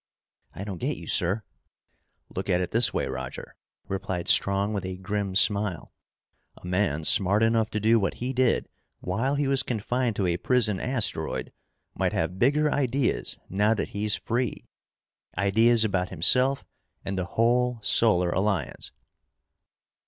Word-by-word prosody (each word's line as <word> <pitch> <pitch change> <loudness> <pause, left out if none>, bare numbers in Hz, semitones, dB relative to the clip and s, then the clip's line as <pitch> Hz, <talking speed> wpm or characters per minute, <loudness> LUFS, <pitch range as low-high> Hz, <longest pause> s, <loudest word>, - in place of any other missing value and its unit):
"I 100 - -6
don't 100 -4 -6
get - - -2
you, - - -10
sir." 95 +5 -1 0.9
"Look 95 +2 -4
at 90 -1 +2
it 90 - -3
this 115 +1 +3
way, - - -1
Roger," 65 -1 -7 0.3
replied 95 -2 -4
Strong 100 +2 +4
with 100 -2 -3
a 95 0 -5
grim 100 0 -3
smile. 100 -3 +2 0.6
"A - - -14
man 90 -4 -1
smart 105 +1 +3
enough 115 -1 +2
to 110 - -2
do 110 +2 +3
what 100 - -1
he 125 +2 -4
did 130 -1 +1 0.3
while 115 +10 -1
he 145 -1 0
was 135 -1 +3
confined 120 0 -2
to 100 - -1
a 85 -1 0
prison 105 -2 +1
asteroid 115 -11 -1 0.4
might - - -1
have 90 +1 -2
bigger 150 +5 +2
ideas 130 -2 -1
now 105 +4 +1
that 105 - -3
he's 105 -1 -1
free. 120 0 -3 0.7
Ideas 110 +4 +4
about 90 -3 -1
himself 130 +2 +2 0.4
and 95 - -3
the 90 -1 -2
whole 120 +1 +2
Solar 90 -6 +3
Alliance!" 95 -8 -2
105 Hz, 150 wpm, -26 LUFS, 95-120 Hz, 0.9 s, Strong